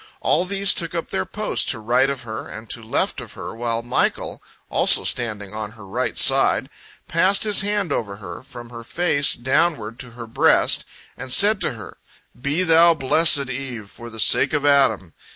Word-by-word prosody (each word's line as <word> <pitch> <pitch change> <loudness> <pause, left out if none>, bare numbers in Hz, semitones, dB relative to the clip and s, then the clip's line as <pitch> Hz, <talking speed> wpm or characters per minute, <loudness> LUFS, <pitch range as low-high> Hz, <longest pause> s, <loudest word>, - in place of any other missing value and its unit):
All 180 - 0
these 195 +1 +2
took 170 0 -5
up 165 - -5
their 95 - -3
post - - -1
to - - +1
right 125 +5 +1
of 140 -2 -5
her 110 -1 -7
and 110 +1 -10
to 120 - -6
left 110 - -3
of - - -12
her, - - -8
while 115 0 -3
Michael, 120 - -2 0.3
also - - +3
standing 105 -4 -1
on 105 0 -7
her 110 -3 -14
right 95 - -4
side, - - +4 0.4
passed 185 +4 +2
his 210 -2 +4
hand 205 -4 -2
over 105 -7 -3
her, 100 0 -10
from 120 -3 -12
her 115 -1 -10
face 145 +1 +1
downward 130 -3 -1
to 125 - -7
her 115 - -8
breast, 115 - +1 0.3
and 130 -1 -9
said 205 +7 +5
to - - 0
her, 110 -4 -12 0.4
"Be 145 +7 -1
thou 165 0 +4
blessed, 140 -1 +2
Eve, 125 -6 -7
for 120 0 -11
the 110 -1 -10
sake - - +4
of 145 -1 -1
Adam. 130 - +2
130 Hz, 190 wpm, -20 LUFS, 115-165 Hz, 0.4 s, said